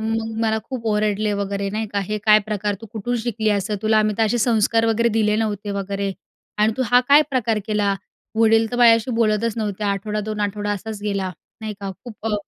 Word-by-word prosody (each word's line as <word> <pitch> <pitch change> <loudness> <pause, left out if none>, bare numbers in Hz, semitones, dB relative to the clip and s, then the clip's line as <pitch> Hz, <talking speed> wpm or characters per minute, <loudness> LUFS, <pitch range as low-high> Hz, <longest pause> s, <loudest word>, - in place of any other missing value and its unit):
मग 225 0 -2
मला 220 -1 +1
खूप 250 -4 -6
ओरडले 210 0 0
वगैरे, 200 0 -3
नाही 215 +2 -2
का, 200 - 0
"हे 215 0 -1
काय 215 -1 +7
प्रकार? 210 -1 -1
तू 225 - -9
कुठून 240 +2 -2
शिकली 220 -2 -1
असं? 210 +2 -3
तुला 220 0 +3
आम्ही 215 -1 +2
तर - - +3
असे 240 +3 0
संस्कार 225 0 +2
वगैरे 230 +1 +2
दिले 210 -1 +2
नव्हते 210 -2 -2
वगैरे 200 0 -3 0.5
आणि 215 +1 +3
तू 260 - +1
हा 245 - +6
काय 290 +2 +8
प्रकार 230 -4 +1
केला?" 210 -2 +1 0.4
वडील 225 0 +4
तर 245 - -3
माझ्याशी 230 0 +5
बोलतच 225 0 +1
नव्हते. 210 -1 -3
आठवडा, 205 +1 -1
दोन 215 0 -4
आठवडा 205 0 -2
असाच 205 +1 -6
गेला, 200 -3 -2 0.3
नाही 215 -1 -5
का, 195 -1 -4
खूप 225 -2 -9
अ 215 - +1
215 Hz, 205 wpm, -21 LUFS, 205-225 Hz, 0.5 s, काय